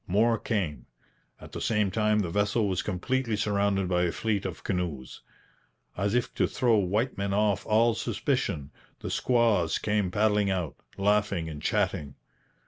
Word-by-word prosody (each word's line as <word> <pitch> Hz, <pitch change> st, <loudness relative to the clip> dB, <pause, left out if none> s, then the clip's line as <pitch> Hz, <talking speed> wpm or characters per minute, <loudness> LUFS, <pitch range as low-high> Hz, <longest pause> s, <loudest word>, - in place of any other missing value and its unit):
More 115 Hz, +5 st, +2 dB
came. 95 Hz, -10 st, -2 dB, 0.5 s
At -, -, -12 dB
the -, -, -6 dB
same 105 Hz, -3 st, +1 dB
time 105 Hz, +1 st, +2 dB
the 85 Hz, -4 st, -3 dB
vessel 105 Hz, +3 st, +1 dB
was 95 Hz, -2 st, 0 dB
completely 115 Hz, +5 st, -1 dB
surrounded 100 Hz, -2 st, +1 dB
by 90 Hz, -1 st, +1 dB
a 90 Hz, -1 st, +1 dB
fleet 105 Hz, -1 st, -1 dB
of 90 Hz, -, -8 dB
canoes. 85 Hz, -9 st, -3 dB, 0.7 s
As 100 Hz, +4 st, 0 dB
if 125 Hz, -, 0 dB
to -, -, +1 dB
throw 115 Hz, -4 st, +2 dB
the 95 Hz, -, -2 dB
white 110 Hz, +5 st, -1 dB
men 100 Hz, 0 st, -1 dB
off 105 Hz, -1 st, +1 dB
all 115 Hz, +2 st, +4 dB
suspicion, 75 Hz, -8 st, -2 dB, 0.3 s
the -, -, -4 dB
squaws 115 Hz, -9 st, +2 dB
came 105 Hz, -3 st, 0 dB
paddling 105 Hz, +1 st, +2 dB
out, 90 Hz, -7 st, -1 dB, 0.2 s
laughing 100 Hz, -4 st, +1 dB
and 75 Hz, -2 st, -7 dB
chatting. 70 Hz, -2 st, -1 dB
100 Hz, 160 wpm, -28 LUFS, 90-110 Hz, 0.7 s, all